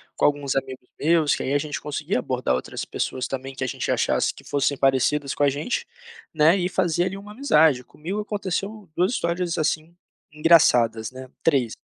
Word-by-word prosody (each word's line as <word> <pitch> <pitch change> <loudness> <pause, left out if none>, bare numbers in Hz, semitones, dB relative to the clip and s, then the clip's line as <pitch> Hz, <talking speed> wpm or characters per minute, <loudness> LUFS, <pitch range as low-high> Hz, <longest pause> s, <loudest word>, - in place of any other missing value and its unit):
com - - +1
alguns 145 -2 +1
amigos 130 -2 -4
meus, 160 -1 +3
que - - -4
aí 135 - -1
a 145 - +3
gente 150 0 -4
conseguia 150 -2 -2
abordar 125 - -1
outras 65 - -5
pessoas 130 -1 -3
também 135 0 -5
que 135 - -5
a - - -1
gente - - -2
achasse - - +1
que - - -15
fossem 140 0 0
parecidas 135 +2 +1
com 145 - 0
a 140 - +5
gente, 145 - -2 0.5
né, 160 +4 +5
e 180 -1 0
fazer 175 -2 +1
ali 190 +1 -3
uma 205 +1 -10
amizade. 160 - +3
Comigo 180 +11 -6
aconteceu 205 0 -4
2 185 +6 +2
histórias, 170 -4 -1
assim, 160 +2 -1 0.4
engraçadas, 125 -8 +4
né, 130 0 -10
3. 135 -8 +2
150 Hz, 185 wpm, -24 LUFS, 135-175 Hz, 0.5 s, a